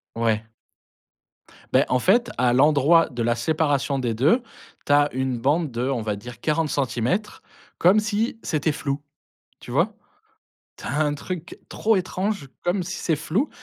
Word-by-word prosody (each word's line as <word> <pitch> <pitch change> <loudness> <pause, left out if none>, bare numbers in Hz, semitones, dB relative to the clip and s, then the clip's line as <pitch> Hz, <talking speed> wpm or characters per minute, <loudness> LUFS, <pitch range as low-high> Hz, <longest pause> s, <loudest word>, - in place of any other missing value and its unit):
Ouais. 110 -1 0 1.2
Beh - - +5
en 125 - +3
fait, 235 - +3
à 125 0 +3
l'endroit 150 +4 +5
de 120 -2 -3
la 120 +1 +2
séparation 145 +1 0
des 120 -3 -1
2, 155 - +3 0.4
tu 145 - +1
as 145 0 +4
une 130 -1 -1
bande 145 +5 +1
de, 120 +1 -3
on 135 -3 -1
va 105 -2 -2
dire 120 +3 -10
40 155 0 0
centimètres, 130 - -1 0.4
comme 190 +5 +5
si, 220 +2 -1
c'était 155 0 0
flou, 140 0 -3 0.6
tu - - -13
vois? - - +1 0.8
Tu - - -10
as 145 - -2
un 150 -1 +1
truc 175 +4 -7
trop 220 0 +1
étrange 185 -3 -2 0.2
comme 175 +1 0
si 175 0 -5
c'est 165 - 0
flou 175 - -1
145 Hz, 165 wpm, -23 LUFS, 125-175 Hz, 1.2 s, Beh